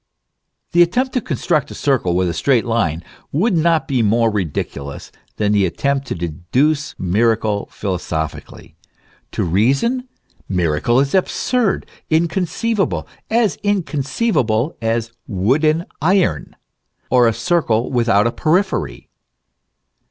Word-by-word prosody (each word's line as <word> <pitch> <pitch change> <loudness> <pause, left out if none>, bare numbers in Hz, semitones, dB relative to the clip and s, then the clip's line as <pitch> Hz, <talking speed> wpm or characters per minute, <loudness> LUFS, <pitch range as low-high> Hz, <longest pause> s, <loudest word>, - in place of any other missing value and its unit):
The 175 - +4
attempt 245 +10 +2
to 250 - 0
construct 150 - -1
a - - -8
circle 125 -11 +1
with 90 0 +2
a 85 - -1
straight 125 - +2
line, 95 -9 0 0.3
would 185 +7 +1
not 165 -1 +2
be 130 -4 +1
more 115 +1 +2
ridiculous 75 -7 -4 0.2
than 105 -1 0
the 105 -1 +3
attempt 140 +8 -1
to - - -3
deduce 125 - -1
miracle 105 +2 0
philosophically. 85 -6 -5 0.6
To - - -1
reason, 135 - +1 0.4
miracle 90 +6 +1
is 140 0 0
absurd, 215 +3 +1 0.2
inconceivable; 180 +6 0 0.2
as 225 -3 +2
inconceivable 155 - 0
as 115 0 -1 0.2
wooden 150 - +1 0.2
iron, 185 +3 +1 0.6
or 125 -1 +5
a - - +3
circle 115 -1 0
without 115 -4 +3
a 115 - +2
periphery. 165 - 0
125 Hz, 115 wpm, -19 LUFS, 105-170 Hz, 0.6 s, or